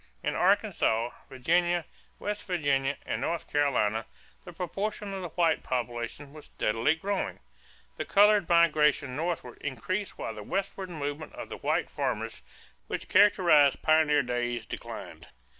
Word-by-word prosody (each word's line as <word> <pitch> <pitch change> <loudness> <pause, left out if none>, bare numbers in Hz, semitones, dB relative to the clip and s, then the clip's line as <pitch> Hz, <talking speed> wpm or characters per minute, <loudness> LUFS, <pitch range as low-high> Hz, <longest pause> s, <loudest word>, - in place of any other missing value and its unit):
In - - 0
Arkansas, 115 +2 +2 0.2
Virginia, 170 +6 +1 0.3
West 205 0 -4
Virginia, 145 -6 0
and - - -2
North 170 -1 -2
Carolina 115 -7 +1 0.4
the 175 - -8
proportion 195 +4 -4
of 190 - -4
the 175 - -5
white 165 -1 +2
population 120 +3 -4
was 155 -1 -11
steadily 115 +8 +1
growing. 195 +4 -2 0.6
The - - -3
colored 205 -2 +5
migration 150 -5 +3
northward 160 -6 -3
increased 170 - -3
while 115 - -4
the 110 - -8
westward 190 - -3
movement 150 -2 -5
of - - -8
white - - 0
farmers - - -3 0.5
which - - -5
characterized 175 -9 +5
pioneer 155 -2 +4
days 120 -2 -2
declined. - - -8
155 Hz, 130 wpm, -29 LUFS, 130-180 Hz, 0.6 s, colored